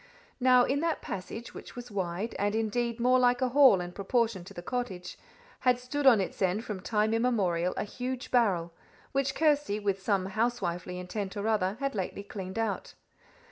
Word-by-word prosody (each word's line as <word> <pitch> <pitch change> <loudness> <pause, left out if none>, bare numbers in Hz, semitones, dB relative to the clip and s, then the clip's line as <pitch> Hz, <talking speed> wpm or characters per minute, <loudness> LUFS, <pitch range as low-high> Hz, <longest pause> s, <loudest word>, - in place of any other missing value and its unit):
Now, 250 -1 +6
in 275 +3 +1
that 330 +1 -1
passage, 210 +5 -6
which - - -10
was 245 -1 -8
wide, 190 +2 -2
and 205 +1 +1
indeed 230 +2 -1
more 250 +2 +4
like 245 0 +4
a 255 - +1
hall 260 -6 +6
in 175 0 -5
proportion 215 0 0
to - - -11
the 175 - -7
cottage, 195 -7 -4 0.4
had 250 -1 +3
stood 270 +3 -1
on 235 -5 +8
its 190 - -4
end 190 +5 +1
from 210 -3 -4
time 215 +2 +1
immemorial 195 -7 +1
a - - 0
huge 250 +4 -5
barrel, 185 -9 +2 0.4
which 270 0 0
Kirsty, 295 -9 +2
with 200 -2 -1
some 195 -2 +1
housewifely 190 -5 -2
intent 190 +3 -5
or 205 +2 -2
other, 205 -2 +1
had 275 0 -1
lately 200 0 -4
cleaned 190 -1 -7
out. 225 -3 -2
220 Hz, 180 wpm, -29 LUFS, 190-250 Hz, 0.4 s, on